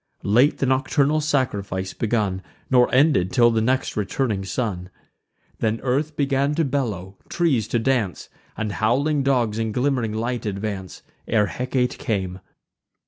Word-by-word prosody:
Late 120 +9 +3
the - - 0
nocturnal 140 +3 +2
sacrifice 100 -10 -1
begun, 105 -4 -1 0.3
Nor 125 -1 +4
ended 130 - +3
till 120 -2 +5
the 110 -1 +1
next 130 +4 0
returning 105 0 -1
sun. 95 -3 -3 0.7
Then 110 0 0
earth 145 +4 0
began 140 0 +1
to 165 0 +1
bellow, 105 -9 -3
trees 135 - +1
to - - 0
dance, 115 -6 0 0.3
And 110 -1 -2
howling 140 +8 +1
dogs 120 -5 +1
in 110 -1 -1
glimm'ring 125 -2 0
light 115 +1 -2
advance, 100 -2 -5 0.2
Ere 110 -2 +3
Hecate 125 +6 -2
came. 95 -4 -2
120 Hz, 140 wpm, -23 LUFS, 105-135 Hz, 0.7 s, till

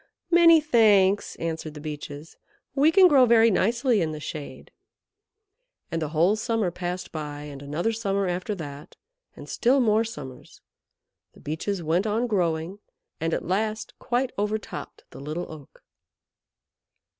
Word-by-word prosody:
"Many 335 -1 +7
thanks," 210 -9 +3
answered 160 -2 -5
the - - -8
Beeches. 150 0 -8 0.4
"We 290 +3 +4
can 375 +1 +7
grow 270 -6 +5
very 230 -1 +5
nicely 230 +3 +2
in 155 -2 -1
the 155 - -6
shade." 150 0 -8 1.2
And 165 - -2
the 155 - -1
whole 170 +6 +3
summer 220 -4 -1
passed 180 +1 -5
by, 150 -2 -6
and 145 -2 -9
another 150 +9 -2
summer 200 -3 -1
after 180 +4 -2
that, 145 -4 -9 0.4
and - - -11
still 260 +4 +2
more 220 -2 +3
summers. 135 - -10 0.7
The - - -18
Beeches 170 +5 -4
went 170 +6 +1
on 220 +3 0
growing, 175 -3 -1 0.4
and 165 +1 -1
at - - -2
last 215 +4 -2
quite 250 +1 -1
overtopped 210 +1 -4
the 130 - -11
Little 155 +5 -4
Oak. 150 -3 -13
190 Hz, 145 wpm, -25 LUFS, 155-225 Hz, 1.2 s, Many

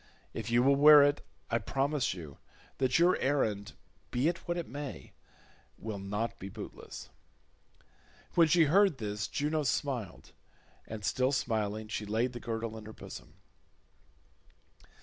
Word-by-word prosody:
If - - -5
you 120 +1 +4
will 140 +1 +5
wear 150 0 +9
it 145 0 +2 0.3
I 115 - +2
promise 135 -5 0
you 80 -6 -10 0.4
that 130 -1 +3
your 175 +2 +4
errand, 110 -8 0 0.4
be 125 +5 +1
it 170 0 0
what 175 0 -1
it 170 - -3
may, 145 0 -7 0.6
will 110 -2 -5
not 105 +4 -3
be 95 - -7
bootless." - - -9 1.2
When 165 -1 +5
she 165 +1 +5
heard 185 +1 +4
this 105 -2 -3
Juno 150 +2 -1
smiled, 130 -5 -3 0.5
and 110 -2 -6
still 130 +7 +1
smiling 110 -4 -1
she 105 -1 -4
laid 115 +4 0
the 120 - -6
girdle 115 -1 -4
in 110 - -11
her 110 - -9
bosom. - - -11
125 Hz, 145 wpm, -31 LUFS, 110-145 Hz, 1.2 s, wear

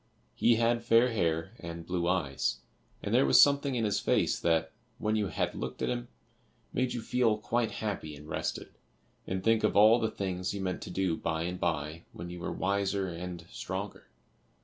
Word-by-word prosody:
He 120 0 +4
had 115 +1 +2
fair 115 +1 +4
hair 80 -6 0
and 85 0 -7
blue 90 -1 -1
eyes, 85 -7 0 0.4
and - - -2
there - - +5
was 65 - +6
something 140 -1 +5
in 115 -2 +1
his 105 - +1
face - - +1
that, 80 -1 +1 0.3
when 110 -3 0
you 105 -2 +1
had - - -1
looked 65 0 -5
at - - +1
him, 120 0 -3 0.7
made 125 0 0
you 120 - -4
feel 115 -3 +2
quite 115 +1 -1
happy 95 -8 -4
and 75 +1 -12
rested, 75 - -3 0.6
and 95 0 -2
think 115 0 +3
of 105 - +2
all 110 +3 +7
the 110 -1 0
things 95 0 -3
you - - -4
meant 95 -1 -2
to - - -7
do 90 -2 0
by 80 0 -2
and 90 +1 -4
by 80 -1 -2
when 85 +1 -7
you 90 - -7
were - - -3
wiser 100 0 0
and 85 0 -6
stronger. 95 +2 -5
95 Hz, 195 wpm, -30 LUFS, 85-115 Hz, 0.7 s, all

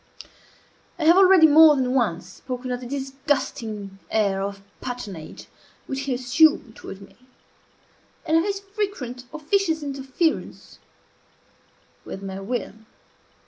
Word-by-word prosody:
I 335 - -3
have 335 +2 +7
already 380 -3 +7
more 310 0 +8
than 255 -2 0
once 210 -11 0
spoken 250 +6 -6
of 245 - -2
the 245 - -7
disgusting 265 -7 -3
air 200 -3 +1
of 200 0 -5 0.2
patronage 205 -11 -7 0.4
which 270 0 -4
he 270 - -1
assumed 255 -1 +3
toward 195 - -10
me, 195 - -17 1.1
and 315 - +1
of 325 - +5
his 400 0 -2
frequent 390 - -5
officious 320 +1 0
interference 275 +3 -3 1.2
with 195 - -8
my 195 0 -5
will. 225 +2 -4
260 Hz, 120 wpm, -24 LUFS, 220-315 Hz, 1.2 s, more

